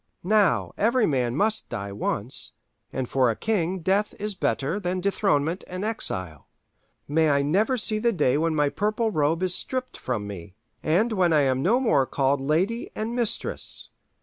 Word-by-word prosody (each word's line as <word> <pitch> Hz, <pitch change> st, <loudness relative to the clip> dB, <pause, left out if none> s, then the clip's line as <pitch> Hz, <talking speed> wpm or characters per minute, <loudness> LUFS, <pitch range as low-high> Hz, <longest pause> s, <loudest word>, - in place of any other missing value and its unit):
Now 205 Hz, 0 st, +2 dB
every 235 Hz, +2 st, +3 dB
man 125 Hz, -4 st, 0 dB
must 215 Hz, +7 st, +1 dB
die 100 Hz, 0 st, -5 dB
once, 105 Hz, +3 st, -2 dB, 0.4 s
and 130 Hz, -2 st, -3 dB
for 130 Hz, -1 st, +2 dB
a 115 Hz, -, 0 dB
king 190 Hz, -, -1 dB
death 195 Hz, +5 st, +1 dB
is 210 Hz, 0 st, -2 dB
better 165 Hz, -1 st, -1 dB
than 185 Hz, -1 st, -2 dB
dethronement 185 Hz, -4 st, 0 dB
and 185 Hz, +3 st, -4 dB
exile. 95 Hz, -, -3 dB, 0.6 s
May 155 Hz, +2 st, +2 dB
I 140 Hz, -1 st, +3 dB
never 205 Hz, -, +2 dB
see 215 Hz, -1 st, +1 dB
the 235 Hz, +2 st, +2 dB
day 140 Hz, -, +2 dB
when 160 Hz, +1 st, +1 dB
my 145 Hz, -1 st, +2 dB
purple 215 Hz, +5 st, 0 dB
robe 160 Hz, +1 st, +1 dB
is 185 Hz, -1 st, +2 dB
stripped 255 Hz, +6 st, -2 dB
from 115 Hz, -5 st, -3 dB
me, 95 Hz, -2 st, -8 dB, 0.3 s
and 205 Hz, +9 st, +2 dB
when 180 Hz, -5 st, +2 dB
I 150 Hz, -, +5 dB
am 130 Hz, -1 st, +1 dB
no 215 Hz, -, +3 dB
more 140 Hz, -, +2 dB
called 135 Hz, +1 st, +1 dB
Lady 180 Hz, -, 0 dB
and 225 Hz, +2 st, -3 dB
Mistress! 240 Hz, -3 st, -1 dB
170 Hz, 175 wpm, -25 LUFS, 135-215 Hz, 0.6 s, I